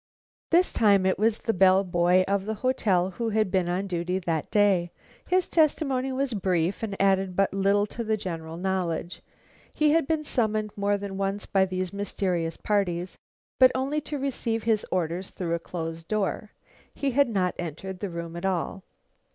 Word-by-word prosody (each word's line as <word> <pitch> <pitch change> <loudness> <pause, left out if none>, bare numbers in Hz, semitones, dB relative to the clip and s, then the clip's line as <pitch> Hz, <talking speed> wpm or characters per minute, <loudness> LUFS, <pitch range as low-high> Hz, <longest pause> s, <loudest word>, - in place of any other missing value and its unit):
This 350 +2 +3
time 200 -4 +4
it 190 - +1
was 220 +1 +2
the 225 - -2
bell 190 0 +5
boy 180 0 +3
of 200 0 0
the 220 - -1
hotel 200 -7 +1
who 230 +4 -3
had 215 -3 +1
been 185 -3 +1
on 185 +3 -1
duty 180 -1 -2
that 165 -4 -2
day. 200 -5 +3 0.4
His 370 0 +2
testimony 275 -5 +1
was 260 -1 -1
brief, 185 -3 0
and 205 -3 -4
added 195 -1 +2
but 195 0 +2
little 200 +1 +2
to 235 +3 -5
the 220 -1 0
general 165 -4 -6
knowledge. 180 -2 -2 0.5
He 305 -1 +3
had 325 -3 +2
been 315 -1 0
summoned 215 -6 0
more 205 0 +1
than 200 -1 -6
once 195 +1 -2
by 190 -1 +2
these 185 -1 -3
mysterious 180 -5 -2
parties, 185 -4 -1 0.4
but 255 -1 +8
only 275 +4 -1
to 295 0 -5
receive 240 -5 -2
his 220 -2 +1
orders 180 +1 -1
through 170 -3 -3
a 170 - 0
closed 165 -1 -6
door. 215 0 -1 0.5
He 280 -1 -1
had 280 0 +3
not 185 -5 0
entered 175 +3 -5
the 200 - -3
room 170 -1 -6
at 170 - -6
all. 190 0 -1
195 Hz, 180 wpm, -26 LUFS, 180-220 Hz, 0.5 s, but